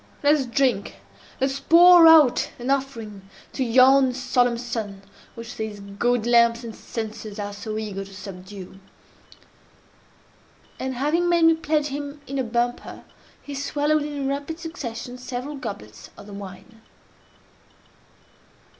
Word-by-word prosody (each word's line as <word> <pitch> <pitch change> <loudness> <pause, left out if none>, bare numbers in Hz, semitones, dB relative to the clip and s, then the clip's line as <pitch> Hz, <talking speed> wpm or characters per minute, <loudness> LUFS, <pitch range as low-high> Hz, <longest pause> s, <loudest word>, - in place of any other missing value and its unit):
let 290 +1 +5
us 280 -4 0
drink! 240 -5 0 0.4
Let 265 +1 +1
us 275 - -5
pour 340 +3 +7
out 310 -6 +6
an 250 +2 -3
offering 225 -8 -4 0.2
to 265 - -1
yon 260 +2 +5
solemn 245 -2 +1
sun 225 -5 -5 0.3
which 230 +1 -9
these 220 -2 -5
gaudy 220 +4 -1
lamps 235 0 +4
and 225 -2 -8
censers 220 -2 -7
are 205 -1 -5
so 215 +1 -6
eager 205 -3 -4
to 195 - -14
subdue!" 190 -1 -10 2.0
And, 260 0 -3
having 310 +7 +1
made 340 -1 +4
me 325 - +6
pledge 305 -2 -1
him 285 +1 -6
in 275 +1 -4
a - - +1
bumper, 240 +1 -3 0.4
he 285 - -8
swallowed 290 +2 0
in 290 -2 -4
rapid 285 +4 -4
succession 250 -7 -7
several 250 +3 -6
goblets 155 - -8
of 200 - -12
the 205 - -11
wine. 200 +3 -11
245 Hz, 135 wpm, -23 LUFS, 215-285 Hz, 2.0 s, pour